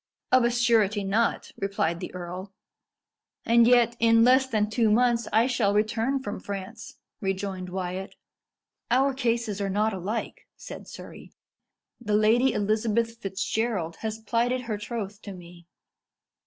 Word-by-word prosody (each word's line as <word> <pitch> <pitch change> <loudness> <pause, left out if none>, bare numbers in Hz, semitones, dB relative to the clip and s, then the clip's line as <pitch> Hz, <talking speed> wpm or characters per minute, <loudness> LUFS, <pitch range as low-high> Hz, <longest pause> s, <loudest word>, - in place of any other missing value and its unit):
"Of 255 -1 +5
a 235 - +3
surety 225 -4 +2
not," 215 +4 0
replied 195 -4 -1
the 180 - -6
earl. 180 +2 -7 0.9
"And 235 0 +5
yet, 240 -1 +4
in 230 0 +5
less 260 +2 +5
than 215 -4 0
two 220 +1 +1
months 235 +1 +2
I 225 +2 +4
shall 230 -6 +1
return 225 +5 0
from 205 - -5
France," 200 +3 -7 0.2
rejoined 195 -2 -3
Wyat. 185 +1 -5 0.7
"Our 265 +3 +3
cases 230 -5 -1
are 200 - -1
not 210 +3 +1
alike," 195 +5 -5
said - - -10
Surrey. - - -11 0.7
"The 210 -3 -1
Lady 225 +5 +4
Elizabeth 220 +2 0
Fitzgerald 195 -3 -2
has 220 -1 -4
plighted 235 +3 0
her 220 -4 -4
troth 210 -2 -6
to 200 - -8
me." 175 -1 -14
215 Hz, 140 wpm, -26 LUFS, 195-235 Hz, 0.9 s, Of